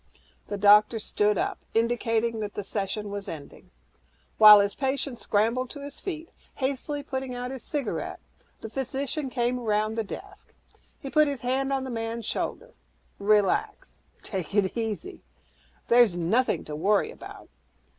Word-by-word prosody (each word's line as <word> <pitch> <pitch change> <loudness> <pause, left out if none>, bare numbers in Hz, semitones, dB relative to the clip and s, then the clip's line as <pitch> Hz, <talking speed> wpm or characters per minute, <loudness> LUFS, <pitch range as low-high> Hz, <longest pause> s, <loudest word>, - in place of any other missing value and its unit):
The 205 - -3
doctor 210 +2 +6
stood 210 -1 +1
up, - - -1 0.2
indicating 230 0 +1
that 205 -1 -5
the 205 - -3
session 200 +1 -3
was 200 0 -5
ending. 145 -3 -9 0.7
While 210 -1 +11
his 200 0 +1
patient 270 -2 -2
scrambled 230 +5 +1
to 285 - -9
his 285 0 -8
feet, 330 -4 -6 0.2
hastily 280 +2 -2
putting 265 -2 -4
out 250 +1 -4
his 265 -2 -6
cigarette, 290 -3 -3 0.4
the 220 - -6
physician 270 +2 -3
came 245 0 0
around 215 -2 0
the 225 0 -1
desk. 200 - -10 0.4
He 275 - -7
put 305 0 +5
his 280 -4 -3
hand 265 +2 0
on 270 -1 0
the 260 - -5
man's 225 0 -4
shoulder, - - -3 0.5
"Relax, 205 -1 +1 0.2
take 190 -2 -5
it 200 -3 +2
easy 230 - -4 0.7
nothing 230 0 +3
to 150 - -6
worry 200 +6 +2
about. - - -12
230 Hz, 145 wpm, -27 LUFS, 210-265 Hz, 0.7 s, While